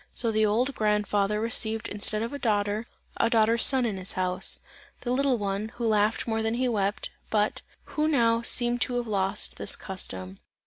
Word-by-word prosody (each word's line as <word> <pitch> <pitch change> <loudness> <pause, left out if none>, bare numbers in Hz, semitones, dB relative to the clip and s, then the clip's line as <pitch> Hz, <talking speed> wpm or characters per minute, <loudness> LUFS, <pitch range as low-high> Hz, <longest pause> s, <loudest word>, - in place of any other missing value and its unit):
So 230 -2 0
the 215 0 +2
old 245 +6 +1
grandfather 210 -1 0
received 225 -1 0
instead 215 +1 -2
of 235 - -5
a 285 - -5
daughter, 210 -1 0 0.3
a 230 - +2
daughter's 230 0 +4
son 260 -2 +6
in 210 -4 -2
his 185 0 -2
house; 185 0 0 0.4
the 245 - -3
little 265 0 +2
one, 200 +1 -3
who 240 -1 -3
laughed 215 0 +1
more 225 -1 0
than 220 +1 -1
he 255 +1 0
wept, 205 -3 -1 0.2
but, 210 -1 0 0.2
who 305 0 -1
now, 230 -6 +2
seemed 240 0 +3
to 250 - 0
have 245 -1 -1
lost 195 -2 -1
this - - -1
custom. 95 - -7
220 Hz, 185 wpm, -27 LUFS, 205-240 Hz, 0.4 s, son